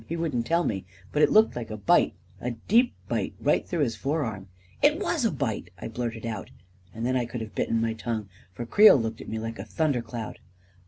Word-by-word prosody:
He 170 Hz, -, -3 dB
wouldn't 145 Hz, -8 st, -1 dB
tell 170 Hz, +1 st, +3 dB
me, 95 Hz, -, -2 dB, 0.3 s
but 150 Hz, -, +1 dB
it -, -, +5 dB
looked 220 Hz, +1 st, +5 dB
like 120 Hz, -2 st, -5 dB
a 110 Hz, -, -5 dB
bite 100 Hz, -, +3 dB, 0.2 s
— -, -, -25 dB
a 125 Hz, -, -1 dB, 0.2 s
deep 240 Hz, +4 st, +4 dB
bite -, -, -2 dB
right -, -, +1 dB
through 170 Hz, -3 st, 0 dB
his 115 Hz, -5 st, -1 dB
forearm." 115 Hz, -7 st, -2 dB, 0.3 s
u 290 Hz, -, +8 dB
It 305 Hz, +3 st, -5 dB
was 340 Hz, -, 0 dB
a -, -, +4 dB
bitel 110 Hz, -, -2 dB
" 90 Hz, -, -25 dB
I -, -, -5 dB
blurted 115 Hz, 0 st, -4 dB
out; 110 Hz, -3 st, -4 dB, 0.4 s
and 115 Hz, +3 st, -4 dB
then 130 Hz, +1 st, +1 dB
I 125 Hz, -2 st, 0 dB
could 120 Hz, 0 st, -5 dB
have 110 Hz, -1 st, -7 dB
bitten 115 Hz, -, 0 dB
my 115 Hz, 0 st, 0 dB
tongue, 110 Hz, -1 st, -3 dB, 0.2 s
for 120 Hz, +6 st, -6 dB
Creel 210 Hz, -, +8 dB
looked 115 Hz, -2 st, -3 dB
at -, -, -9 dB
me 110 Hz, -, -3 dB
like 115 Hz, -1 st, -5 dB
a -, -, -3 dB
thunder 125 Hz, +6 st, 0 dB
cloud. 115 Hz, -1 st, -6 dB
115 Hz, 245 wpm, -27 LUFS, 110-155 Hz, 0.4 s, u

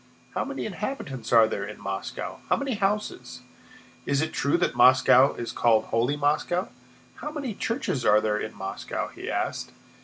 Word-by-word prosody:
"How -, -, 0 dB
many -, -, -5 dB
inhabitants 135 Hz, -, -5 dB
are 115 Hz, -2 st, +7 dB
there 100 Hz, -, -3 dB
in 105 Hz, +1 st, -7 dB
Moscow? 95 Hz, 0 st, -5 dB
How -, -, +4 dB
many 275 Hz, -2 st, -2 dB
houses? 210 Hz, -, -2 dB, 0.7 s
Is 140 Hz, -1 st, +2 dB
it 155 Hz, +2 st, -1 dB
true 140 Hz, +4 st, +1 dB
that 175 Hz, -, +1 dB
Moscow 130 Hz, +1 st, +6 dB
is 120 Hz, -, -5 dB
called 115 Hz, -2 st, +3 dB
'Holy 120 Hz, +6 st, +1 dB
Moscow'? 150 Hz, +5 st, 0 dB, 0.5 s
How -, -, -5 dB
many 285 Hz, -6 st, -4 dB
churches 230 Hz, -, -2 dB
are 105 Hz, -1 st, +5 dB
there 105 Hz, -1 st, 0 dB
in 110 Hz, -, -5 dB
Moscow?" 95 Hz, 0 st, -4 dB
he -, -, -8 dB
asked. -, -, -2 dB
140 Hz, 165 wpm, -26 LUFS, -, 0.7 s, are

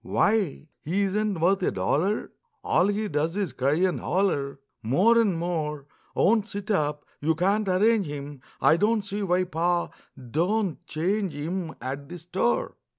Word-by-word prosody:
Why, 200 Hz, -8 st, +1 dB, 0.2 s
he 185 Hz, +6 st, 0 dB
isn't 200 Hz, -1 st, 0 dB
worth 190 Hz, +4 st, +3 dB
a -, -, +2 dB
dollar! 150 Hz, -, 0 dB, 0.3 s
All 180 Hz, -, +3 dB
he 210 Hz, +1 st, 0 dB
does 155 Hz, +1 st, -1 dB
is 195 Hz, -10 st, -2 dB
cry 135 Hz, +2 st, +1 dB
and 180 Hz, +2 st, +1 dB
holler 140 Hz, -8 st, 0 dB, 0.2 s
More 180 Hz, -, +4 dB
and 205 Hz, -7 st, +2 dB
more; 155 Hz, -4 st, -2 dB, 0.3 s
Won't 215 Hz, 0 st, +3 dB
sit 205 Hz, 0 st, -5 dB
up 150 Hz, -5 st, 0 dB
you 160 Hz, +2 st, +1 dB
can't 200 Hz, +5 st, +1 dB
arrange 200 Hz, +1 st, +3 dB
him, 145 Hz, -1 st, -7 dB, 0.2 s
I 160 Hz, -, +5 dB
don't 210 Hz, +2 st, +1 dB
see 200 Hz, +1 st, -3 dB
why 185 Hz, -1 st, +2 dB
Pa 175 Hz, 0 st, 0 dB, 0.3 s
do'n't 170 Hz, -, -1 dB
change 185 Hz, +2 st, -1 dB
him 165 Hz, +3 st, -4 dB
At 135 Hz, +3 st, -5 dB
the 175 Hz, -, -7 dB
store. 190 Hz, -, -1 dB
180 Hz, 155 wpm, -26 LUFS, 150-200 Hz, 0.3 s, I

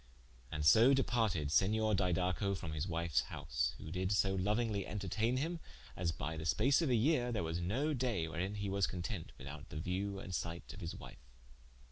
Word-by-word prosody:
And 75 Hz, -1 st, -2 dB
so 115 Hz, -, +7 dB
departed 110 Hz, -, +1 dB
Senior 110 Hz, +5 st, +3 dB
Didaco 90 Hz, 0 st, +1 dB
from 85 Hz, -4 st, -5 dB
his 80 Hz, +3 st, -2 dB
wiue's 85 Hz, -6 st, +1 dB
house: 60 Hz, +1 st, -2 dB
who 80 Hz, -, -8 dB
did 95 Hz, +2 st, -1 dB
so 100 Hz, -1 st, +3 dB
louingly 105 Hz, +2 st, 0 dB
interteigne 105 Hz, +6 st, -1 dB
him 165 Hz, +5 st, -2 dB, 0.4 s
as 85 Hz, -2 st, 0 dB
by 80 Hz, +1 st, -4 dB
the 80 Hz, -, -5 dB
space 135 Hz, -, +3 dB
of 160 Hz, -, +1 dB
a 125 Hz, -, +4 dB
yeare, 125 Hz, +1 st, +2 dB
there 110 Hz, -7 st, -1 dB
was 80 Hz, +1 st, -2 dB
no 130 Hz, -, 0 dB
daye 120 Hz, -, 0 dB
wherein 90 Hz, +5 st, -3 dB
he 100 Hz, -1 st, -3 dB
was 100 Hz, 0 st, +1 dB
content 90 Hz, -1 st, -4 dB
without 70 Hz, +1 st, -9 dB
the 75 Hz, -, -6 dB
view 95 Hz, +5 st, -2 dB
and 95 Hz, -1 st, -7 dB
sight 85 Hz, -1 st, -4 dB
of -, -, -10 dB
his -, -, -4 dB
wife. 60 Hz, -, -12 dB
95 Hz, 190 wpm, -35 LUFS, 80-110 Hz, 0.4 s, so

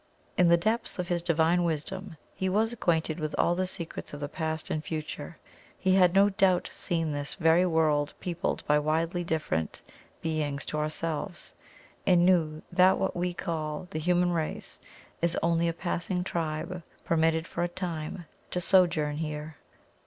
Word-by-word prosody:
In 180 Hz, -, +5 dB
the 170 Hz, 0 st, +6 dB
depths 220 Hz, +7 st, -1 dB
of 180 Hz, -2 st, -3 dB
His 175 Hz, -1 st, +1 dB
Divine 170 Hz, +1 st, +3 dB
wisdom 170 Hz, +3 st, -3 dB, 0.2 s
He 190 Hz, -, -1 dB
was 220 Hz, +4 st, +2 dB
acquainted 165 Hz, -7 st, 0 dB
with 155 Hz, -1 st, -2 dB
all 170 Hz, -, +3 dB
the 185 Hz, +1 st, 0 dB
secrets 170 Hz, -4 st, -5 dB
of -, -, -8 dB
the 145 Hz, -, -3 dB
Past 160 Hz, 0 st, -3 dB
and 155 Hz, -, -1 dB
Future; 155 Hz, -1 st, -5 dB, 0.4 s
He 190 Hz, -1 st, +2 dB
had 185 Hz, -1 st, +5 dB
no 200 Hz, +1 st, +6 dB
doubt 190 Hz, -2 st, +3 dB
seen 165 Hz, -2 st, -1 dB
this 145 Hz, 0 st, -4 dB
very 170 Hz, +1 st, +4 dB
world 155 Hz, -3 st, +2 dB
peopled 175 Hz, -2 st, -2 dB
by 150 Hz, 0 st, +4 dB
widely 165 Hz, +4 st, 0 dB
different 155 Hz, -, -2 dB, 0.4 s
beings 150 Hz, -4 st, -2 dB
to 150 Hz, -, -2 dB
ourselves, 160 Hz, +3 st, -3 dB, 0.5 s
and 175 Hz, -2 st, +5 dB
knew 160 Hz, -4 st, +2 dB
that 185 Hz, +1 st, +5 dB
what -, -, -1 dB
we 180 Hz, +1 st, 0 dB
call 155 Hz, -2 st, -3 dB
the 155 Hz, -, -2 dB
human 175 Hz, +2 st, +2 dB
race 160 Hz, -3 st, -3 dB, 0.4 s
is 170 Hz, 0 st, +2 dB
only 170 Hz, 0 st, +2 dB
a -, -, +2 dB
passing 175 Hz, +1 st, -2 dB
tribe 165 Hz, 0 st, -3 dB, 0.2 s
permitted 160 Hz, 0 st, +2 dB
for 170 Hz, -, -4 dB
a 175 Hz, -, +2 dB
time 175 Hz, -1 st, -5 dB, 0.2 s
to 180 Hz, -, -1 dB
sojourn 170 Hz, -5 st, +3 dB
here. 155 Hz, -1 st, -5 dB
165 Hz, 165 wpm, -29 LUFS, 155-180 Hz, 0.5 s, the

